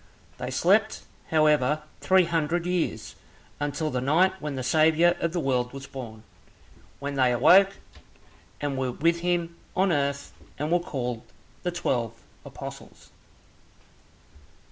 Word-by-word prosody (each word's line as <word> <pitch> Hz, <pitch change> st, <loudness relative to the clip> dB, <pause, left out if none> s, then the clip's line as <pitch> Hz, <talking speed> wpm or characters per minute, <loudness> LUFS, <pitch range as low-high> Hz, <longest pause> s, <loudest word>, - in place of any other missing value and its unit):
They 125 Hz, -, -4 dB
slept, 200 Hz, +11 st, +2 dB, 0.3 s
however, 150 Hz, -2 st, +3 dB, 0.2 s
three 190 Hz, -1 st, +4 dB
hundred 165 Hz, 0 st, -1 dB
years, 180 Hz, -2 st, -2 dB, 0.4 s
until 145 Hz, +1 st, -2 dB
the 125 Hz, -, -1 dB
night 170 Hz, +8 st, +3 dB
when 150 Hz, -2 st, -4 dB
the 130 Hz, -, -4 dB
Saviour 160 Hz, +5 st, +4 dB
of 170 Hz, -, -1 dB
the 175 Hz, -, -2 dB
world 125 Hz, -4 st, 0 dB
was 135 Hz, 0 st, -8 dB
born. 115 Hz, -6 st, -9 dB, 0.8 s
Then 140 Hz, 0 st, -4 dB
they 130 Hz, -2 st, +3 dB
awoke, 190 Hz, +11 st, +5 dB, 0.8 s
and 140 Hz, -2 st, -2 dB
were 130 Hz, -2 st, -1 dB
with 170 Hz, +4 st, +1 dB
him 170 Hz, -1 st, -1 dB, 0.2 s
on 190 Hz, 0 st, +2 dB
earth, 140 Hz, -2 st, -1 dB, 0.2 s
and 150 Hz, +3 st, -3 dB
were 175 Hz, -, +4 dB
called 125 Hz, -8 st, -4 dB, 0.4 s
the 180 Hz, -, -1 dB
twelve 120 Hz, -10 st, -1 dB, 0.3 s
apostles. -, -, -10 dB
150 Hz, 130 wpm, -26 LUFS, 130-175 Hz, 0.8 s, awoke